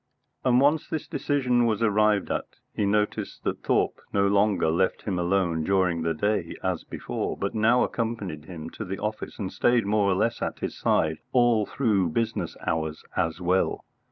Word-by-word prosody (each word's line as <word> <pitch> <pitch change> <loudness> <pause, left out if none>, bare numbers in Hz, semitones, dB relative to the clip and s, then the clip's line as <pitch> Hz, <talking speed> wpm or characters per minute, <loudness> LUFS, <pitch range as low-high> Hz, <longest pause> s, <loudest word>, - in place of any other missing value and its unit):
And 125 -1 +4
once 145 +3 +2
this 160 -2 -3
decision 125 -4 +1
was 110 0 0
arrived 105 -1 +2
at, - - -3 0.2
he 105 - 0
noticed 105 +1 -1
that - - -2
Thorpe - - +1
no 100 0 +2
longer 100 -4 +2
left 95 +3 0
him 95 -4 -2
alone 85 -2 +1
during 90 -2 +1
the 80 0 0
day 100 0 -1
as 95 -3 -1
before, - - -4
but 100 - -2
now 115 +3 +4
accompanied 105 -10 -3
him 80 -2 -8
to - - -6
the 95 -1 -4
office 105 +2 -4
and 95 -3 -4
stayed 120 -2 +2
more 100 -1 +2
or 95 - +2
less 115 +4 0
at - - -2
his - - -4
side 80 0 +1
all 120 -4 +4
through 105 -9 +1
business 115 +7 -2
hours 80 -1 -2
as 80 +1 0
well. 90 +1 0
100 Hz, 180 wpm, -26 LUFS, 90-115 Hz, 0.2 s, And